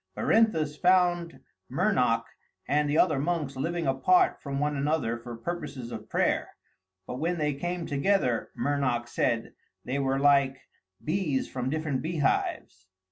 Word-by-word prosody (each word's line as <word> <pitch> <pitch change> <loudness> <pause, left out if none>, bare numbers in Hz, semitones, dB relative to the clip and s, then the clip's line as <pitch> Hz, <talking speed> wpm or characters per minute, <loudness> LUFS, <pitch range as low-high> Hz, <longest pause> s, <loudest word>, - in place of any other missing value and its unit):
Berinthus 160 -10 +2
found 175 -2 +2 0.3
Mernoc 130 - +2 0.4
and 150 +1 +1
the 150 - +1
other 155 -6 +3
monks 150 -3 -1
living 165 +5 -2
apart 135 +7 +3
from 140 -1 -3
one 150 0 0
another 140 -4 0
for 120 0 -8
purposes 140 -3 -5
of - - -8
prayer, - - 0 0.5
but 125 - -6
when 170 +3 0
they 150 -2 0
came 175 +4 -3
together, 140 - +1
Mernoc 125 -3 0
said, 115 -1 -1 0.3
they 135 +3 -2
were 135 -1 +1
like 140 -1 +4 0.5
bees 155 -5 0
from 125 0 -3
different 150 -3 -1
beehives. 145 - -1
145 Hz, 135 wpm, -28 LUFS, 130-170 Hz, 0.5 s, like